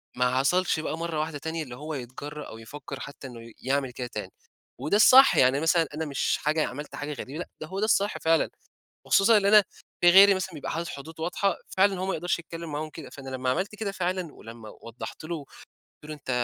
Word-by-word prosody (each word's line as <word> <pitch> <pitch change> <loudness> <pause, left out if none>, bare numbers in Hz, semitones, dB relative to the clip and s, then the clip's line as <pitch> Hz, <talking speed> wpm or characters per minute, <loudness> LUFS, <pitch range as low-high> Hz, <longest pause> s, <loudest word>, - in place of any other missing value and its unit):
ما 125 +1 +1
حصلش 180 +3 +2
بقى 155 0 -3
مرّة 165 -2 -3
واحدة 155 -1 -2
تانية 160 +2 -4
اللي 125 -3 -9
هو 150 +4 -6
يتجرأ 145 +3 -7
أو 110 - -9
يفكر 135 +3 -9
حتّى 140 -1 -8
إنّه 120 -2 -10 0.2
يعمل 135 -1 0
كده 125 0 -5
تاني. - - -6 0.5
وده - - 0
الصح 260 +5 +8
يعني، 130 +2 +4
مثلًا 165 0 +3
أنا 160 +1 -2
مش 140 -2 0
حاجة 155 +1 +1
عملت 145 +4 -7
حاجة 145 +1 -4
غريبة 140 +3 -7
لأ 175 - -6
ده 155 - -5
هو 190 +3 -5
ده 215 - +2
الصح 205 -1 +2
فعلًا، 165 0 +2 0.6
وخصوصًا 215 +3 +5
إن 205 - +2
أنا 210 0 +7 0.4
في 175 - +7
غيري 195 +2 +8
مثلًا 185 -2 -4
بيبقى 145 - -5
حاطط 170 +1 -3
حدود 160 +3 -9
واضحة 185 +4 0 0.2
فعلًا 195 -1 +3
هو 185 - -2
ما 195 - -1
يقدرش 175 +2 -1
يتكلّم 165 -1 -8
معاهم 155 +1 -4
كده، 155 -3 -10
فأنا 135 -1 -10
لمّا 130 0 -1
عملت 190 +11 -1
كده 210 -2 -3
فعلًا 180 -3 -3
ولمّا 115 0 -11
وضحت 115 +6 -9
له، 170 +2 -3
وقلت 145 -3 -13 0.4
له: 155 - -6
"أنت 145 -3 -11
155 Hz, 220 wpm, -27 LUFS, 140-180 Hz, 0.6 s, الصح